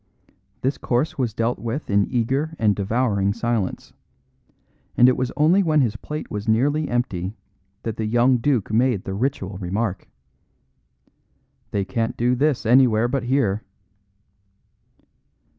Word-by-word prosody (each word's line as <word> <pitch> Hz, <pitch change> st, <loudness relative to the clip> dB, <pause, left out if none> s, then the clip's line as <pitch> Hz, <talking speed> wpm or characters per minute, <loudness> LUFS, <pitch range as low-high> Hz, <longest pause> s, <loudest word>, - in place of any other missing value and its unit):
This 135 Hz, +2 st, -1 dB
course 130 Hz, +5 st, -1 dB
was 120 Hz, -5 st, -1 dB
dealt 115 Hz, +2 st, -1 dB
with 120 Hz, +6 st, -4 dB
in 100 Hz, 0 st, +2 dB
eager 135 Hz, +6 st, 0 dB
and 105 Hz, -3 st, +2 dB
devouring 100 Hz, -1 st, 0 dB
silence; 115 Hz, -5 st, -2 dB, 1.0 s
and 125 Hz, -, +7 dB
it 130 Hz, -, +4 dB
was 130 Hz, -1 st, -2 dB
only 165 Hz, +6 st, +4 dB
when 155 Hz, -5 st, +3 dB
his 115 Hz, -4 st, 0 dB
plate 150 Hz, +7 st, -6 dB
was 105 Hz, 0 st, -5 dB
nearly 145 Hz, +8 st, +1 dB
empty 100 Hz, -5 st, -2 dB, 0.5 s
that 115 Hz, -2 st, -4 dB
the 110 Hz, -, -2 dB
young 120 Hz, +3 st, +3 dB
duke 120 Hz, -4 st, 0 dB
made 120 Hz, -3 st, +2 dB
the 95 Hz, -, -5 dB
ritual 100 Hz, -4 st, -2 dB
remark: 100 Hz, +2 st, -3 dB, 1.6 s
"They 100 Hz, -1 st, -1 dB
can't 115 Hz, +1 st, -2 dB
do 120 Hz, +1 st, +2 dB
this 140 Hz, 0 st, +1 dB
anywhere 120 Hz, -1 st, +4 dB
but 130 Hz, 0 st, -2 dB
here." 120 Hz, -6 st, +1 dB
120 Hz, 135 wpm, -22 LUFS, 105-130 Hz, 1.6 s, and